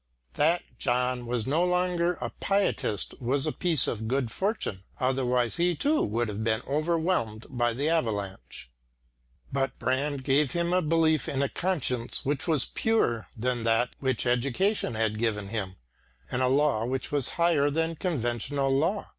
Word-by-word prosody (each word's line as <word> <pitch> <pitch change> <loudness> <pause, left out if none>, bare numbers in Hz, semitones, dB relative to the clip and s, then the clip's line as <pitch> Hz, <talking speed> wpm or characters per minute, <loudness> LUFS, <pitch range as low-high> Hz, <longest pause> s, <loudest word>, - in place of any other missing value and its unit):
That 165 +4 +2 0.2
John 125 -1 0
was 120 -2 -1
no 155 +6 +2
longer 180 -1 +1
a - - -5
pietist 195 - 0
was 135 +4 +1
a 155 - +1
piece 165 -5 +2
of 110 -1 -3
good 130 -1 0
fortune, 190 - -1 0.2
otherwise 125 -2 +1
he 175 0 +2
too 290 - +2
would 115 +3 0
have 105 +1 -4
been 110 +1 0
overwhelmed 155 -7 0
by 120 -2 +1
the 140 +6 -1
avalanche. 105 - -2 0.9
But 135 0 -1
Brand 135 +2 -1
gave 140 0 +2
him 170 0 0
a 185 - +3
belief 160 -2 +2
in 135 0 0
a 140 - 0
conscience 130 -10 -1
which 145 +3 -1
was 155 -5 +3
purer 120 - 0
than 120 +1 -1
that 115 +2 +2
which 130 -3 0
education 125 - +1
had 110 -1 0
given 105 -3 -1
him, 100 -4 -4 0.6
and 125 - -1
a 130 - +3
law 135 -4 +2
which 130 +2 -3
was 145 -4 +2
higher 165 -4 +3
than 165 +2 0
conventional 135 - -1
law. 170 +9 +1
135 Hz, 160 wpm, -28 LUFS, 120-165 Hz, 0.9 s, a